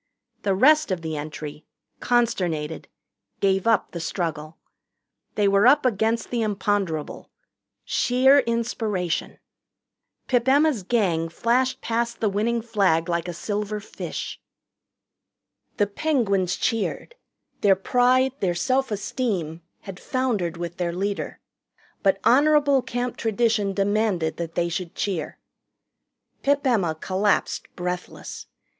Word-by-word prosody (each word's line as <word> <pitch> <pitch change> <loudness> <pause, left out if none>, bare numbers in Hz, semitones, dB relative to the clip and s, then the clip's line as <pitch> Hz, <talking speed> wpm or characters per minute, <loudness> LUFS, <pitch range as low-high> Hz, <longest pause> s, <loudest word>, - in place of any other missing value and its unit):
The 195 -2 +1
rest 305 +8 +5
of 180 -3 -2
the 160 -1 -3
entry, 150 0 -6 0.4
consternated, 180 -11 0 0.5
gave 195 +1 +1
up 225 -3 +2
the 170 - -5
struggle. 160 -2 -4 0.8
They 205 -1 +2
were 200 +3 +4
up 285 +1 +5
against 225 0 0
the 240 -1 0
imponderable 200 -6 -2 0.6
sheer 265 +3 +4
inspiration. 220 -7 -2 0.9
Pip 245 -1 +1
Emma's 285 -3 +4
Gang 180 -6 0
flashed 245 +8 0
past 235 +1 -2
the 215 - +1
winning 225 +3 0
flag 190 -7 +1
like 170 0 -1
a - - -2
silver 210 +5 -3
fish. 205 - -6 1.4
The 205 - +3
Penguins 200 - 0
cheered. 230 - -2 0.5
Their 200 -2 +5
pride, 250 +6 +3
their 180 -3 0
self 265 +8 +1
esteem, 195 -6 -2 0.2
had 195 -3 -9
foundered 215 -10 -1
with 175 0 -5
their 175 -1 -1
leader. 200 +3 -3 0.6
But 195 -1 +2
honorable 285 +1 +4
Camp 245 0 -3
tradition 220 -2 +1
demanded 200 -4 0
that 165 -1 -5
they 175 0 +1
should 170 0 -4
cheer. 185 -6 -3 1.0
Pip 285 +1 +1
Emma 195 -11 +2
collapsed 195 +5 0
breathless. 180 0 -5
205 Hz, 115 wpm, -24 LUFS, 175-240 Hz, 1.4 s, rest